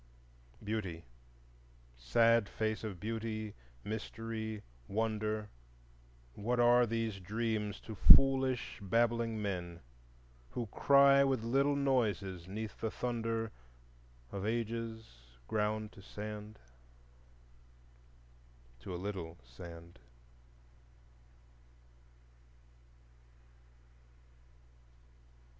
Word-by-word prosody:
Beauty, 100 -6 -3 0.9
sad 115 - +3
face 110 0 -2
of 100 -5 -5
Beauty, 110 0 -3 0.3
Mystery, 110 0 -4 0.2
Wonder, 110 0 -1 0.8
What 120 - -1
are 120 0 +6
these 115 -3 -2
dreams 105 +1 -2
to 110 - -8
foolish 130 +3 +5
babbling 115 +2 +1
men 90 -4 -3 0.7
Who 120 - -2
cry 140 +4 +6
with 135 -4 +1
little 135 +5 +2
noises 105 -10 0
'neath 105 +3 -6
the 110 - 0
thunder 115 -1 -2 0.8
Of 95 - -4
Ages 115 0 -2 0.4
ground 105 0 -1
to 100 - -14
sand, 105 +1 -7 2.2
To 90 +9 -6
a - - -3
little 90 -3 -5
sand. 85 +7 -11
110 Hz, 75 wpm, -34 LUFS, 100-115 Hz, 2.2 s, are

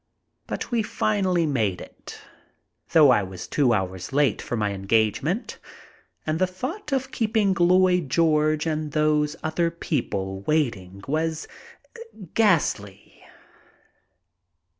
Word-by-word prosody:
But - - -5
we 235 -2 +2
finally 190 -5 0
made 110 - 0
it, - - -11 0.7
though 150 -5 +7
I 120 - +4
was 95 -2 -7
two 135 -5 +2
hours 95 -4 -2
late 140 -5 +2
for 120 - -4
my 105 -2 0
engage 105 +2 +1
ment, 180 - -3 0.7
and 155 +1 -1
the 185 - +3
thought 275 - -6
of 265 -1 -1
keeping 215 -3 +1
Lloyd 180 -2 +3
George 155 0 +2
and 155 -2 -2
those 150 0 +1
other 165 +2 0
people 100 - -3
waiting 100 -11 -1
was 160 +2 -1 0.9
ghastly. 110 - 0
155 Hz, 120 wpm, -24 LUFS, 110-180 Hz, 0.9 s, though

